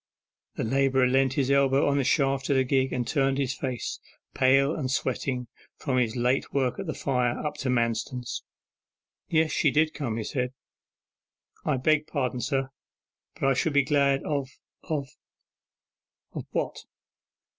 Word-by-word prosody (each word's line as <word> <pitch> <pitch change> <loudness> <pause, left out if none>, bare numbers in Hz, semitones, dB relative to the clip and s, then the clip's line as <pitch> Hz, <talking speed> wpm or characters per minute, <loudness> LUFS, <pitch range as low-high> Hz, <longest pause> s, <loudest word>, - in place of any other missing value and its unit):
The - - -2
labourer 135 +2 +2
leant 130 +1 +2
his 140 -1 +1
elbow 140 0 +4
upon 140 0 +2
the - - +2
shaft 135 0 +1
of 140 - +3
the 130 - +4
gig 130 0 +1
and 125 -2 -2
turned 135 -1 +1
his 135 -2 0
face, 130 -4 -4 0.3
pale 135 +3 +4
and 135 -5 -2
sweating 130 -1 -1 0.3
from 130 -2 -1
his 115 -2 0
late 125 +2 +1
work 130 0 0
at 195 - -5
the 155 - -3
fire, 125 -3 0
up 150 - -3
to 135 - -2
Manston's. 120 +1 -1 0.9
'Yes, 160 -1 +2
she 150 - +3
did 155 +2 +2
come,' 120 -7 -3
he 115 - -2
said.... 125 +3 -2 1.1
'I - - +1
beg 155 +3 +2
pardon, 130 -4 -2
sir, 135 -1 -1 0.7
but 135 - +1
I 135 - +4
should 145 +4 0
be 140 -1 +4
glad 140 -1 +2
of 140 -3 -2 0.4
of 145 -3 -2 0.8
' - - -13
'What? - - -2
135 Hz, 160 wpm, -27 LUFS, 125-140 Hz, 1.1 s, elbow